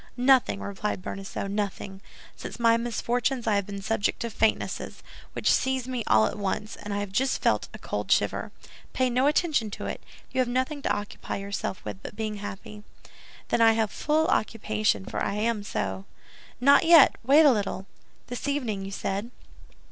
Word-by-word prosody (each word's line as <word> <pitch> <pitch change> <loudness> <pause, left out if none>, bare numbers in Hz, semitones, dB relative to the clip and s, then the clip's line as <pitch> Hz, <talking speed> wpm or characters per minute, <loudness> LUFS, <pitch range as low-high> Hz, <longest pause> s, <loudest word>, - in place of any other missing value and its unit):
"Nothing," 250 -5 +3
replied 200 -1 -3
Bonacieux, 195 0 -5
"nothing. 195 -1 -4 0.3
Since - - -8
my 230 -1 +5
misfortunes 240 +2 -1
I 220 - +2
have 200 -1 0
been 200 -1 -6
subject 220 -1 0
to 235 - -3
faintnesses, 220 +1 -1 0.3
which - - +1
seize 260 -2 +1
me 250 -3 -3
all 110 0 +5
at 210 - -3
once, 205 +2 -3
and 205 - -8
I 200 - -1
have 205 -2 -5
just 260 +6 +1
felt - - +2
a - - -9
cold - - -4
shiver. - - +1 0.4
Pay 255 -1 +1
no 255 +3 +2
attention 295 -7 +1
to - - -6
it; - - -5 0.3
you 260 - -2
have 255 - 0
nothing 260 +4 -1
to - - -2
occupy 205 0 -4
yourself 200 -1 -4
with 190 - -6
but - - -9
being 215 -1 -3
happy." 205 +1 -8 0.7
"Then - - +2
I 225 0 +7
have 220 -2 0
full 310 +1 +1
occupation, 215 - 0
for - - -4
I - - 0
am 220 0 0
so." 195 -1 -3 0.5
"Not 280 +3 +6
yet; 330 -3 +7
wait 285 +6 +6
a 285 - +8
little! 200 -4 -2 0.4
This 245 +3 -5
evening, 245 -9 -1
you 195 - -6
said." 200 +3 -3
220 Hz, 180 wpm, -27 LUFS, 200-255 Hz, 0.7 s, a